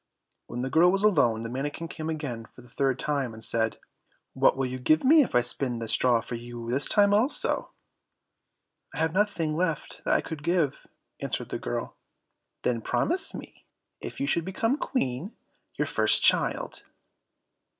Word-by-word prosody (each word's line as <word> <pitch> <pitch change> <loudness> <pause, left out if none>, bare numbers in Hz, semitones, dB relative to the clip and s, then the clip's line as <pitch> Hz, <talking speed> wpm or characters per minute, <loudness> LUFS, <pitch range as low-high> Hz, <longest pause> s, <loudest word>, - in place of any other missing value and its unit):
When 120 +1 -4
the 130 - -2
girl 175 +3 +6
was 195 +1 0
alone 120 - +3
the 115 - -4
manikin 145 +6 -4
came 160 0 -5
again 140 -8 -4
for 125 - -16
the 125 - -18
third 135 -2 0
time, 135 -5 -2
and 110 - -9
said, 110 -1 0 0.6
"What - - +3
will 135 - 0
you 130 0 -4
give 155 +5 +3
me 310 +4 +7
if 245 - -1
I 120 - +6
spin 125 0 -1
the 115 -1 -5
straw 115 +1 +2
for - - -8
you 120 0 -6
this 135 +3 0
time 205 -1 +5
also?" 230 +8 +1 1.3
"I - - -6
have 160 0 +1
nothing 180 -6 +1
left 165 -2 -2
that - - +2
I - - +3
could 160 -3 -7
give," 170 -3 0 0.3
answered - - -3
the - - -3
girl. - - -4 0.7
"Then 120 -2 0
promise 355 - -1
me, - - -11 0.3
if - - -7
you 275 - 0
should 170 -11 0
become 225 +8 0
Queen, 160 - -2 0.4
your - - 0
first - - +2
child." - - +2
145 Hz, 175 wpm, -27 LUFS, 120-180 Hz, 1.3 s, me